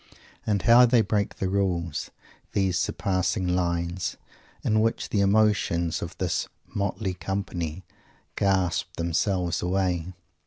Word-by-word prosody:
And 105 -3 +1
how 120 +1 +7
they 120 -1 +5
break 100 -1 0
the 95 - -2
rules, 90 -5 -1 0.4
these 95 -3 +1
surpassing 95 0 0
lines, 85 0 -1 0.5
in 110 0 +2
which 115 +1 0
the 100 - +1
emotions 100 -5 +2
of 85 - -5
his 90 -3 -1 0.2
motley 100 -1 -2
company 90 -3 -4 0.5
gasp 95 -3 +1
themselves 90 +1 0
away! 90 -1 0
95 Hz, 115 wpm, -26 LUFS, 85-100 Hz, 0.5 s, how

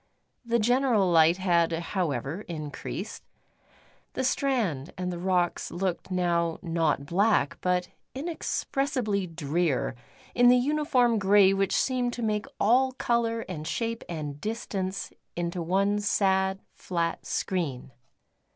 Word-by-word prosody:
The 235 0 +1
general 235 -4 +3
light 165 +1 +5
had, 170 -3 +2
however, 165 - -2
increased. 165 +5 -6 0.9
The 260 - -2
strand 225 - 0
and 180 0 -2
the 175 - -5
rocks 180 -1 0
looked 180 0 -3
now 170 -2 0
not 165 -4 0
black, 200 +8 +2
but 180 -1 0 0.3
inexpressibly 270 - -1
drear 165 -2 -1 0.4
in 245 0 +5
the 250 +1 +7
uniform 255 -4 +2
grey 195 0 +5
which 195 0 +1
seemed 250 -2 +1
to 240 - -4
make 210 -1 -1
all 260 +4 +3
colour 235 -2 0
and 160 -7 -6
shape 230 +4 -2
and 150 -4 -5
distance 195 -4 -3 0.2
into 175 0 -2
one 195 +4 +1
sad 190 -1 +1
flat 170 -2 -3
screen. 150 -9 -2
190 Hz, 120 wpm, -27 LUFS, 170-230 Hz, 0.9 s, the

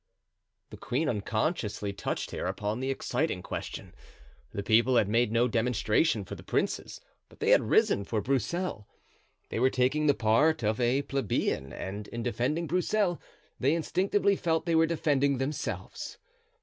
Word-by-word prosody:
The - - -9
queen 145 +6 -1
unconsciously 110 - -1
touched 100 - -3
here - - -3
upon 105 +2 -2
the 130 +1 -2
exciting 135 - -1
question. - - -6 0.6
The 100 - -4
people 115 +5 +4
had 110 -4 +4
made 115 +1 +2
no 120 +2 +3
demonstration 115 0 +1
for - - -8
the - - -8
princes, - - -2 0.3
but - - -19
they - - +2
had - - +4
risen 100 - +3
for 110 +2 -2
Broussel; 135 - -2 0.6
they - - -2
were 130 +2 +4
taking 130 +5 +1
the 140 - +4
part 120 +7 +3
of 110 +3 0
a 125 +4 +2
plebeian 110 - -1
and 100 +9 -6
in 115 0 -5
defending 125 +8 -1
Broussel 180 +1 0 0.4
they 140 +5 +3
instinctively 195 +4 +1
felt 165 -2 0
they 170 - 0
were 165 0 +4
defending 140 -4 +1
themselves. 135 +3 -4
125 Hz, 155 wpm, -29 LUFS, 110-160 Hz, 0.6 s, people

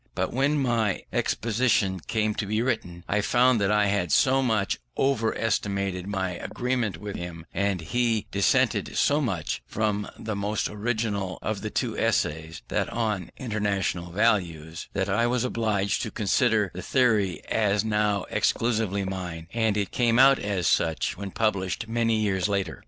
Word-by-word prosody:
But - - -1
when 140 +4 +2
my 115 -7 0
exposition 105 -5 +1
came 110 +3 -1
to 105 - -3
be 110 +3 0
written, 90 -9 -2
I 105 +1 +1
found 120 +1 +3
that 100 0 +2
I 105 0 +3
had 100 -4 0
so 135 -1 +4
much 110 -6 0 0.2
over 120 -5 +1
estimated 100 -4 -1
my 95 -2 -1
agreement 110 +1 -2
with 100 +3 -6
him, 85 -2 -7
and 100 -1 0
he 115 +4 0
dissented 100 -1 +1
so 145 +2 +3
much 95 - -2
from 105 -1 -1
the 110 -1 -4
most 100 +1 -1
original 105 -4 -2
of - - -2
the - - -3
two - - -2
Essays, 80 +2 -1
that - - 0
on 105 -6 -2
International 100 -6 -2
Values, 85 -6 0
that 95 0 0
I 110 +4 +2
was 125 0 +1
obliged 105 -5 0
to 115 - -3
consider 110 -1 +1
the 90 - -6
theory 110 -8 +1
as 105 -1 +1
now 105 -2 +1
exclusively 110 -2 +1
mine, 90 -3 -5
and 110 -2 +1
it 100 -2 -1
came 120 -2 +2
out 135 +1 +7
as 100 -4 -2
such 80 +2 +1
when 100 +1 -6
published 100 0 -1
many 115 0 +1
years 100 -2 0
later. 95 -5 -2
105 Hz, 160 wpm, -26 LUFS, 95-115 Hz, 0.2 s, out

